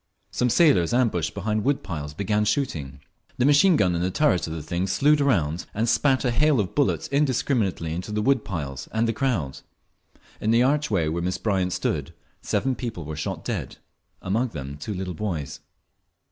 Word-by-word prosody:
Some 125 Hz, -, +1 dB
sailors 120 Hz, -, +4 dB
ambushed 90 Hz, -11 st, +1 dB
behind 110 Hz, 0 st, -1 dB
wood 140 Hz, +1 st, 0 dB
piles 75 Hz, -5 st, -6 dB
began 105 Hz, +3 st, 0 dB
shooting. 80 Hz, -, -2 dB, 0.4 s
The 125 Hz, -, +2 dB
machine 145 Hz, +6 st, +5 dB
gun 90 Hz, -10 st, +2 dB
in 85 Hz, -, -1 dB
the 90 Hz, -, +1 dB
turret 95 Hz, -, +2 dB
of 80 Hz, -, -5 dB
the 80 Hz, -2 st, -5 dB
thing 90 Hz, +4 st, -2 dB
slewed 145 Hz, +8 st, +3 dB
around 90 Hz, -, +1 dB
and 110 Hz, +3 st, 0 dB
spat 130 Hz, +3 st, +2 dB
a 125 Hz, -, +2 dB
hail 145 Hz, +2 st, +3 dB
of 95 Hz, -4 st, -1 dB
bullets 145 Hz, -2 st, +1 dB
indiscriminately 125 Hz, -, 0 dB
into 90 Hz, +5 st, -5 dB
the 105 Hz, 0 st, -1 dB
wood 135 Hz, +1 st, +2 dB
piles 70 Hz, -9 st, -5 dB
and 110 Hz, +1 st, +1 dB
the 115 Hz, -, 0 dB
crowd. 110 Hz, -, -1 dB, 0.8 s
In 110 Hz, -, -1 dB
the 115 Hz, +2 st, +4 dB
archway 130 Hz, -, +1 dB
where 85 Hz, +2 st, -2 dB
Miss 90 Hz, +1 st, -1 dB
Bryant 95 Hz, -4 st, 0 dB
stood -, -, -2 dB, 0.3 s
seven 135 Hz, 0 st, 0 dB
people 115 Hz, -, -5 dB
were 80 Hz, +1 st, -5 dB
shot 75 Hz, -, -4 dB
dead, -, -, -4 dB, 0.5 s
among 110 Hz, +7 st, 0 dB
them 70 Hz, -, -7 dB
two 85 Hz, +8 st, -5 dB
little 90 Hz, -1 st, -4 dB
boys. 85 Hz, -6 st, -4 dB
105 Hz, 185 wpm, -24 LUFS, 85-130 Hz, 0.8 s, machine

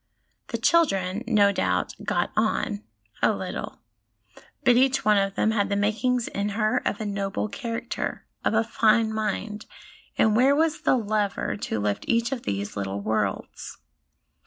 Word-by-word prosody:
The -, -, -3 dB
children, 200 Hz, -, +2 dB
no 205 Hz, -4 st, +4 dB
doubt, 90 Hz, -, 0 dB
'got -, -, 0 dB
on' 100 Hz, +1 st, 0 dB, 0.4 s
a -, -, +4 dB
little; -, -, -6 dB, 0.8 s
but 245 Hz, -2 st, +5 dB
each 265 Hz, +2 st, +3 dB
one 210 Hz, -1 st, +5 dB
of 195 Hz, 0 st, -1 dB
them 220 Hz, -, +2 dB
had 205 Hz, -2 st, +1 dB
the 200 Hz, -, 0 dB
makings 225 Hz, +4 st, +1 dB
in 200 Hz, +1 st, -2 dB
her 215 Hz, +4 st, +1 dB
of -, -, -1 dB
a 215 Hz, -, -3 dB
noble 200 Hz, 0 st, -2 dB
character, 230 Hz, +2 st, -4 dB, 0.2 s
of -, -, +1 dB
a 225 Hz, -, +4 dB
fine 225 Hz, 0 st, +2 dB
mind, 215 Hz, 0 st, -3 dB, 0.5 s
and 220 Hz, -1 st, +4 dB
where 265 Hz, +4 st, +5 dB
was 320 Hz, +1 st, +1 dB
the -, -, +3 dB
lever 210 Hz, -3 st, -1 dB
to 110 Hz, -, -3 dB
lift 105 Hz, 0 st, -1 dB
each 235 Hz, +1 st, +1 dB
of 265 Hz, -3 st, -3 dB
these 100 Hz, -, -3 dB
little 100 Hz, 0 st, -3 dB
worlds 105 Hz, -1 st, -3 dB
215 Hz, 160 wpm, -25 LUFS, 195-235 Hz, 0.8 s, but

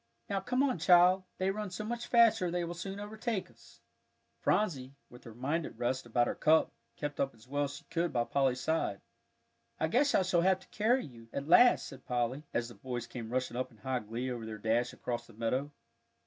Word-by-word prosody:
"Now 195 Hz, -, +1 dB
come 250 Hz, +5 st, 0 dB
on, 260 Hz, -10 st, +1 dB
child; 180 Hz, +2 st, +5 dB
they 190 Hz, +1 st, +1 dB
run 210 Hz, 0 st, -4 dB
so 185 Hz, +4 st, -5 dB
much 240 Hz, +2 st, -4 dB
faster 225 Hz, -6 st, +5 dB
they 175 Hz, 0 st, -1 dB
will 170 Hz, 0 st, -4 dB
soon 195 Hz, +3 st, -6 dB
overtake 215 Hz, 0 st, -3 dB
us." -, -, -20 dB, 0.6 s
Phronsie, 140 Hz, -10 st, 0 dB, 0.2 s
with 125 Hz, +2 st, -14 dB
her 115 Hz, -2 st, -10 dB
mind 145 Hz, +7 st, -1 dB
at -, -, -12 dB
rest 125 Hz, 0 st, -1 dB
about 120 Hz, +1 st, +2 dB
her -, -, -1 dB
cup, 160 Hz, +1 st, +3 dB, 0.2 s
kept 145 Hz, -1 st, -5 dB
up 135 Hz, -3 st, 0 dB
as 115 Hz, +2 st, -19 dB
well 145 Hz, +2 st, 0 dB
as 140 Hz, 0 st, -6 dB
she -, -, -11 dB
could 170 Hz, 0 st, -1 dB
by 120 Hz, -1 st, +1 dB
Polly's 130 Hz, 0 st, +1 dB
side. 160 Hz, -10 st, -1 dB, 0.8 s
"I 160 Hz, -, +1 dB
guess 275 Hz, -, +3 dB
I 190 Hz, -, +4 dB
shall 180 Hz, -2 st, +2 dB
have 190 Hz, +1 st, +3 dB
to -, -, -18 dB
carry 240 Hz, +5 st, +2 dB
you," 115 Hz, -4 st, -13 dB
at 140 Hz, +1 st, -4 dB
last 245 Hz, +9 st, +6 dB
said 135 Hz, -2 st, -11 dB
Polly, 125 Hz, +2 st, -1 dB
as 120 Hz, -1 st, -1 dB
the 120 Hz, -, -10 dB
boys 125 Hz, -2 st, -5 dB
came 115 Hz, -3 st, -7 dB
rushing 130 Hz, 0 st, -2 dB
up 130 Hz, +1 st, -2 dB
in 115 Hz, -, -21 dB
high 130 Hz, +3 st, -2 dB
glee 120 Hz, +4 st, -4 dB
over 120 Hz, -2 st, -5 dB
their 110 Hz, -1 st, -6 dB
dash 115 Hz, +3 st, +1 dB
across 120 Hz, -1 st, -4 dB
the 115 Hz, -, -16 dB
meadow. 125 Hz, +6 st, -1 dB
145 Hz, 220 wpm, -32 LUFS, 120-190 Hz, 0.8 s, last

